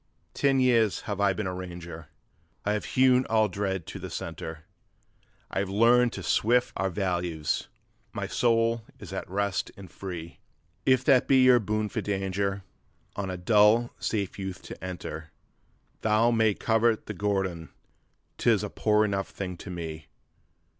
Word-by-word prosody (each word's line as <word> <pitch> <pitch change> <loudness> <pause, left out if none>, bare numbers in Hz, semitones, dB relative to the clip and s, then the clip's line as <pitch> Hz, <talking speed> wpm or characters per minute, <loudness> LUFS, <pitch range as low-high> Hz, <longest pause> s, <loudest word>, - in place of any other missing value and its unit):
'Ten 135 -1 +2
years 115 -5 +3
have 100 -1 -4
I 100 -1 +4
been 110 +1 -3
a 95 - -2
ranger, 85 -3 -8 0.6
I 105 - +1
have 105 - -2
hewn 130 0 +5
all 110 -1 +3
dread 95 -3 -3
to - - -7
the - - -6
centre; 80 0 -6 0.9
I - - -1
have 100 -1 -1
learned 120 +4 +4
to - - -6
sift 120 +3 +2
out 95 -1 -1
values; 85 -5 -1 0.4
my - - -4
soul 115 -1 +1
is - - -10
at - - -5
rest 100 0 -1
and 95 -3 -11
free. 85 -3 -7 0.5
If 130 -1 +4
that 130 -2 +4
be 130 -1 +5
your 125 -1 +7
boon 110 0 -1
for 110 +1 -3
danger, 100 0 -2 0.5
on 100 -2 -3
a 90 - -4
dull 105 +5 +4
safe 100 -3 -2
youth 95 -2 -5
to - - -10
enter, 85 -3 -6 0.7
Tho' 110 +2 +3
some 120 - +1
may 110 -2 +3
covet 115 0 +1
the 105 - -5
guerdon, 95 -5 -2 0.7
'tis - - +3
a - - -4
poor 105 0 +2
enough 100 -2 -1
thing 90 -2 -5
to 95 - -9
me. 80 -3 -6
100 Hz, 160 wpm, -27 LUFS, 90-115 Hz, 0.9 s, your